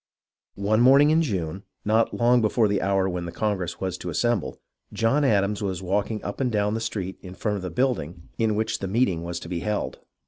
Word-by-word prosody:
One 105 +3 +1
morning 140 +4 +6
in 160 +1 +4
June, 95 - -2 0.2
not 110 +2 +3
long 120 +1 +3
before 110 +1 +3
the 100 -1 0
hour 95 -1 +1
when 90 -2 -3
the 85 - -5
congress 95 -5 -2
was 95 -1 -3
to 90 - -5
assemble, 110 +3 -1 0.3
John 125 +6 +2
Adams 105 -4 +2
was 95 -2 -3
walking 105 +4 -1
up 100 - -4
and 125 -2 +1
down 105 -1 +1
the 110 - -1
street 100 -5 -4
in 90 -1 -10
front 105 0 -1
of - - -6
the 90 - -4
building 90 - -2
in 110 -2 +2
which 110 +1 -1
the 95 - -3
meeting 95 -5 +1
was 85 0 -4
to - - -8
be 85 -1 -3
held. 105 +2 -3
105 Hz, 215 wpm, -25 LUFS, 95-115 Hz, 0.3 s, morning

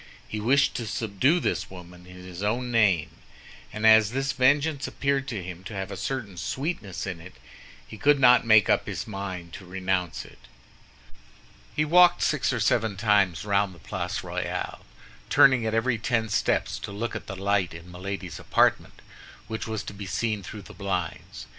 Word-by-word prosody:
He 105 - -4
wished 135 +6 +3
to 115 - -4
subdue 120 - +1
this - - -2
woman 90 -1 -12
in 90 - -12
his 90 0 -8
own 120 +4 -1
name; 95 -9 +3 0.6
and 105 +1 -3
as 110 -1 +7
this 135 +1 0
vengeance 145 +3 +2
appeared 140 -1 -1
to 110 -8 -4
him 90 0 -8
to 105 - -7
have 95 0 -4
a - - -4
certain 110 -6 -4
sweetness 110 - -4
in 90 -4 -5
it, 90 +3 -12 0.5
he 110 - -11
could 145 -1 +4
not 125 -1 +6
make 110 -3 +5
up - - +2
his - - -4
mind 95 -5 -6
to - - -9
renounce 95 -1 -2
it. - - -16 1.4
He 155 - +2
walked 175 +2 +5
six 140 -9 +1
or 120 - -1
seven 110 -3 +1
times 100 -5 +2
round 100 -2 +1
the - - -16
Place - - -4
Royale, - - -4 0.5
turning 125 -4 +5
at 110 - -1
every 115 0 +1
ten 110 -1 0
steps - - 0
to - - -7
look 110 +3 -4
at - - -6
the 95 - -5
light 100 -1 0
in 85 +2 -11
Milady's 90 -1 -6
apartment, - - +1 0.4
which 110 0 -4
was 110 -1 -3
to - - -8
be 100 -1 -8
seen 110 +1 -1
through 100 +2 -9
the - - -12
blinds. 90 -10 -4
105 Hz, 180 wpm, -26 LUFS, 95-120 Hz, 1.4 s, as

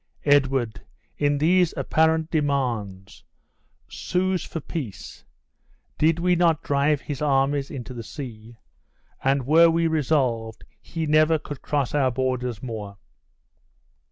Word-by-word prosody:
Edward, 135 -5 +2 0.4
in 145 0 +2
these 175 +3 +3
apparent 160 0 +1
demands, 120 - -2 0.6
sues 185 0 -1
for 165 - -6
peace. 140 - -7 0.8
Did 160 +1 +3
we 180 +1 +2
not 165 -3 +2
drive 140 +1 +1
his 145 -2 -6
armies 140 -1 +1
into 130 -2 -7
the 120 - -6
sea? 115 -1 -9 0.7
And 135 -1 +1
were 165 +4 +6
we 165 0 +1
resolved, 130 -8 0 0.2
he 165 -1 -4
never 155 +1 +4
could 145 -2 -9
cross 145 -4 -1
our 140 -3 +2
borders 125 -2 -2
more. 105 -5 -6
140 Hz, 120 wpm, -24 LUFS, 125-160 Hz, 0.8 s, were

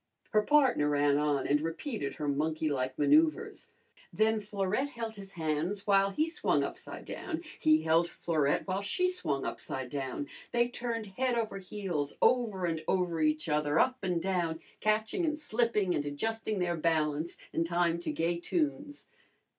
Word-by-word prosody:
Her 215 - +4
partner 255 - +4
ran 145 0 +3
on 145 -2 +1
and 145 +1 +2
repeated 165 - -3
her 150 - -3
monkeylike 145 -2 -1
manoeuvres. 310 - +2 0.4
Then 220 0 +2
Florette 205 +5 -1
held 230 -4 -5
his 195 -1 -10
hands 165 +5 -2
while 195 -1 +4
he 305 +11 0
swung 335 +2 +1
upside - - -6
down, 335 -2 -5 0.2
he 155 0 +4
held 165 +2 +3
Florette 155 -5 0
while 190 +1 -1
she 360 - +1
swung 150 - -1
upside 130 -2 -4
down. 140 0 -3 0.2
They 240 0 +2
turned 235 -2 -3
head 245 +5 -1
over 220 -4 -2
heels, 180 -7 -3
over 220 -7 +2
and 160 -2 -2
over 175 -3 +1
each 155 +1 +1
other, 150 0 +1
up 255 +5 +3
and 180 -3 0
down, 170 -3 -1 0.2
catching 215 - +1
and 305 -2 0
slipping, 220 - +1
and 145 - 0
adjusting 215 +9 -2
their 175 -2 0
balance, 155 0 0 0.2
in 165 - +1
time 170 0 +1
to 170 - -3
gay 165 +3 0
tunes. 290 - -2
180 Hz, 160 wpm, -31 LUFS, 155-225 Hz, 0.4 s, Her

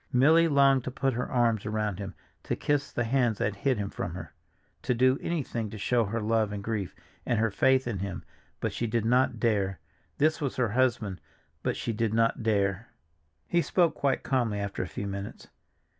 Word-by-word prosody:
Milly 155 +6 +5
longed 140 -3 +4
to - - -2
put 135 +1 -1
her 120 +2 -3
arms 115 -4 +2
around 105 -2 -2
him, 100 -1 -6 0.3
to - - -1
kiss 145 -1 0
the 120 - -1
hands 120 -2 +1
that 100 0 -1
hid 130 +3 +1
him 100 -1 -3
from 90 -3 -4
her, 95 - -8 0.5
to 125 - 0
do 130 +3 +3
anything 120 -9 -2
to 110 - -8
show 115 +3 +1
her 115 +4 -2
love 110 -1 +1
and 100 -1 -5
grief, 105 -4 -3 0.3
and 120 - 0
her 110 0 +1
faith 130 +6 +3
in 110 -5 -2
him, 95 -2 -4 0.4
but - - -2
she 120 - -2
did 115 0 0
not 125 0 +2
dare. 100 -5 +1 0.4
This 155 +2 +2
was 140 -3 -2
her 125 -3 +1
husband, 110 -5 0 0.4
but - - -1
she 115 - -2
did 110 0 0
not 115 0 +2
dare. 100 -1 0 0.6
He 175 - +2
spoke 170 -1 +2
quite 135 -2 0
calmly 120 -6 0
after 100 -1 -3
a 90 - -3
few 100 - -5
minutes. 100 0 -6
115 Hz, 200 wpm, -28 LUFS, 105-130 Hz, 0.6 s, Milly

